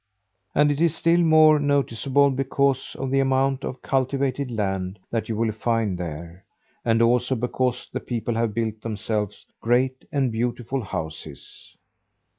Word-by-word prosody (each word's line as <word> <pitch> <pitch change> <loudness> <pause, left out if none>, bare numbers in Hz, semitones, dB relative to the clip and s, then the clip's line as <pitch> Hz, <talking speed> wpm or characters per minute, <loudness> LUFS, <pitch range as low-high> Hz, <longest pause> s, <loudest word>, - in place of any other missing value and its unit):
And 150 0 +4
it 145 +2 -2
is 170 -1 +3
still 170 +1 +3
more 155 -2 +6
noticeable 140 -1 +2
because 135 0 0
of 135 -1 -3
the 135 - +3
amount 135 0 +1
of 130 - -6
cultivated 135 0 0
land 95 -4 -2
that 115 -1 -2
you 110 - -1
will 110 0 0
find 110 -2 0
there; 85 +1 -7 0.4
and 115 0 +3
also 125 +2 +2
because 125 +1 -1
the - - -1
people 120 -1 -3
have 115 -2 -1
built 110 -2 -2
themselves 105 -2 -3 0.2
great 130 +3 +1
and 135 -4 +1
beautiful 120 +3 -2
houses. 80 -6 -8
125 Hz, 145 wpm, -24 LUFS, 110-135 Hz, 0.4 s, more